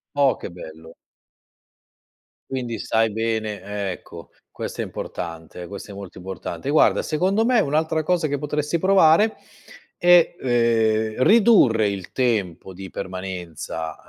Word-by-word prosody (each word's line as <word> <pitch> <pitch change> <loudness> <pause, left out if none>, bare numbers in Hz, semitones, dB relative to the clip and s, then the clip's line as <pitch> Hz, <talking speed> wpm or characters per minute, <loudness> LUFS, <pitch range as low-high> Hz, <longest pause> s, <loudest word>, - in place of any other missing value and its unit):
Oh, 140 -3 +3
che - - -7
bello. 80 -2 -12 1.5
Quindi 125 -3 -4
sai 115 -1 +1
bene 105 -3 -3
ecco, 90 - -11 0.2
questo - - -6
è - - -1
importante 85 +1 -7
questo 100 +2 -9
è - - -9
molto 100 -2 -10
importante. 95 +8 -6
Guarda 155 - +3
secondo 190 +8 +1
me 245 -1 +3
un'altra 160 -1 0
cosa 170 0 0
che 145 -1 -2
potresti 150 +3 -2
provare 190 +2 +4 0.6
è, 175 -1 +5
ehm, 115 -2 +1
ridurre 195 - +5
il 95 -2 -6
tempo 100 -8 -1
di 95 +1 -9
permanenza, 90 -4 -6
115 Hz, 125 wpm, -22 LUFS, 95-155 Hz, 1.5 s, è